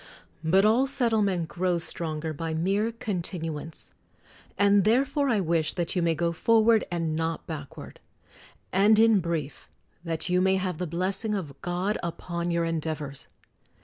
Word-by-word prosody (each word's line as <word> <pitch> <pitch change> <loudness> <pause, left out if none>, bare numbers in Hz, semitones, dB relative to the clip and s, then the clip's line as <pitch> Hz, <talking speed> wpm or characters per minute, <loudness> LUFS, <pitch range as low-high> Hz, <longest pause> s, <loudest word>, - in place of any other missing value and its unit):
But 190 +5 +4
all 235 +5 +4
settlement 215 - +1
grows 175 -1 -1
stronger 160 -2 -3
by 160 +1 -4
mere 200 +7 0
continuance. 170 -8 -5 0.7
And 200 -1 +4
therefore 275 +6 +2
I 225 -4 +2
wish 165 -3 0
that 175 0 -2
you 180 - +1
may 165 -1 +2
go 170 +1 0
forward 225 +5 +3
and 165 -3 -2
not 165 +1 -2
backward; 150 -4 -8 0.7
and 205 +3 +5
in 225 -2 +5
brief 165 -6 -4 0.3
that 165 -2 -3
you 180 0 +2
may 190 0 +3
have 185 -3 -2
the 180 - -2
blessing 190 +6 -1
of 160 -8 -4
God 180 +4 -1
upon 170 0 -4
your 170 0 +1
endeavors 155 -4 -3
175 Hz, 145 wpm, -27 LUFS, 165-205 Hz, 0.7 s, and